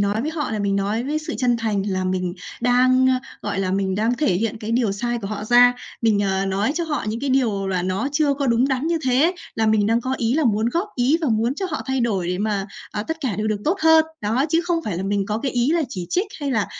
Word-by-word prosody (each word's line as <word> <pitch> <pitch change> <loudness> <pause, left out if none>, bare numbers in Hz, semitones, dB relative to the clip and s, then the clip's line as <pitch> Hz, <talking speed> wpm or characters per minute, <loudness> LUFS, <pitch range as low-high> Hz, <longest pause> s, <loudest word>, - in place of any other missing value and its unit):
nói 205 +3 0
với 310 - -2
họ 310 -3 -3
là 220 - -2
mình 200 -1 0
nói 205 +4 -1
với 300 +3 -1
sự 310 - -5
chân 245 -2 +2
thành 215 -4 -1
là 185 -1 -1
mình 185 -1 -1 0.3
đang, 255 +1 +4
a, 255 -1 +2 0.2
gọi 205 -1 -3
là, 190 -1 0
mình 190 0 0
đang 220 +4 +1
thể 240 -9 +1
hiện 225 +4 -1
cái 215 0 -5
điều 235 -4 +1
sai 240 +4 -2
của 205 - -6
họ 210 +1 -4
ra. 245 +2 +6 0.3
Mình, 210 -3 +3
à, 195 0 0
nói 200 +8 0
cho 340 0 -1
họ 300 -2 -2
những 225 +2 -3
cái 280 0 -1
điều 225 -7 +1
là 185 -2 0
nó 185 +8 -1
chưa 290 -2 +2
có 280 -1 -2
đúng 240 +3 +3
đắn 265 +3 -1
như 335 -1 +1
thế, 270 +8 +3 0.2
là 225 - +1
mình 215 -1 +3
đang 230 +2 +2
có 260 +2 -2
ý 235 +2 +1
là 315 - +2
muốn 220 -1 +2
góp 345 - -1
ý 260 +6 +3
và 310 - 0
muốn 230 +3 +1
cho 380 +5 -3
họ 305 - -3
thay 265 0 0
đổi 200 -7 0
để 180 0 -1
mà, 205 -1 -1 0.2
à, 210 - -3
tất 320 +8 -4
cả 245 -10 -2
đều 215 +1 -1
được 210 -1 -1
tốt 360 +5 +1
hơn. 320 0 +6 0.2
Đó, 230 +5 +1
chứ 330 +2 +2
không 345 -1 0
phải 195 -5 -3
là 185 - -3
mình 195 0 0
có 210 +1 -1
cái 265 +3 -3
ý 245 +3 +1
là 335 - +2
chỉ 185 -9 -5
trích, 370 +5 +1
hay 285 -1 -2
là, 225 -6 +1
230 Hz, 285 wpm, -22 LUFS, 205-270 Hz, 0.3 s, ra